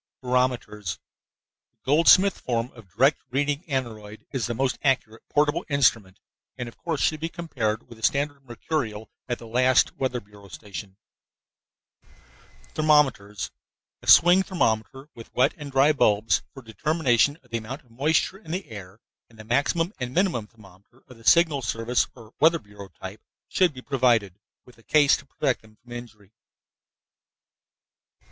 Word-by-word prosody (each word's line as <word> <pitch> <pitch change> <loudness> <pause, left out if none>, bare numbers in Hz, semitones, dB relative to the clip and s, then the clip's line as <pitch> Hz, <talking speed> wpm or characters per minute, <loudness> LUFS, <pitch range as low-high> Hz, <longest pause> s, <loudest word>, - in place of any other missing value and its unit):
BAROMETERS 125 -6 -1 0.8
The - - -48
Goldsmith 170 +7 +5
form 120 0 -2
of 115 -6 -16
direct 135 +5 +3
reading 145 +4 -1
aneroid 110 -7 -5
is 130 -4 -2
the 120 - -3
most 130 +1 -1
accurate 125 -5 0
portable 150 +1 +1
instrument 115 -9 +2 0.4
and, 125 -2 -5
of 115 - -11
course, 160 +1 -3
should 155 - +1
be 165 +2 -3
compared 125 -11 -3
with 115 - -14
a - - -17
standard 140 +1 0
mercurial 120 -3 -4 0.2
at 120 - -1
the - - -12
last 125 +2 +3
weather 130 -2 -1
bureau 100 -1 -17
station. 100 +1 -9 1.8
THERMOMETERS 135 - +2 0.5
A - - -14
swing 175 +2 +7
thermometer, 135 - -1
with 115 - -13
wet 125 - +3
and 145 -2 -9
dry 135 +3 +5
bulbs 110 -5 +2
for 135 - -12
determination 140 +3 +1
of 125 - -26
the 115 - -1
amount 130 +7 -8
of 120 - -27
moisture 155 +9 0
in 210 - -16
the 185 0 -4
air, 100 -1 -10 0.3
and 115 - -20
the 110 - -10
maximum 145 - 0
and 125 0 -5
minimum 175 - +1
thermometer 105 +3 -20
of 125 - -13
the 115 - -18
signal 160 -5 +4
service 115 +1 0
or 115 -2 -15
weather 165 +2 +5
bureau 105 -6 -12
type 95 +2 -10 0.3
should 180 -3 +3
be 130 -3 -11
provided, 120 -8 +1 0.3
with 125 -2 -19
a - - -21
case 145 +1 +4
to 140 - -15
protect 130 -1 -1
them 110 0 -20
from 120 +3 -20
injury. 110 -5 -10
125 Hz, 155 wpm, -25 LUFS, 110-145 Hz, 1.8 s, swing